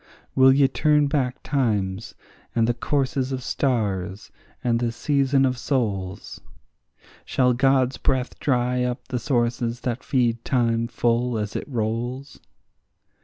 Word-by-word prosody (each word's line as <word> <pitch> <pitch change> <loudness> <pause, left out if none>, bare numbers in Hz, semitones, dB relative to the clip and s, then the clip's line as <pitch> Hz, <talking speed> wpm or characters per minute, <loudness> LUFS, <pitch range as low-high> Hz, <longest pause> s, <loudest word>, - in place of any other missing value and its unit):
Will 130 0 +6
ye 135 0 +5
turn 150 +2 +2
back 140 -3 -1
times, 110 -7 -1 0.4
and 115 -1 +3
the 120 - +1
courses 130 +1 -1
of 130 -1 -3
stars, 105 -7 -1 0.3
and 115 -1 +1
the 120 -1 0
season 135 +2 +2
of 130 -2 -1
souls? 105 -8 -2 0.8
Shall 125 -1 +2
God's 130 +1 +2
breath 130 -2 -1
dry 125 -2 +1
up 125 0 -4
the 125 - -1
sources 120 -1 -1
that 125 0 -3
feed 120 -3 0
time 115 -3 +1
full 120 0 0
as 105 -1 -4
it - - -4
rolls? 120 +3 -3
125 Hz, 130 wpm, -24 LUFS, 115-135 Hz, 0.8 s, Will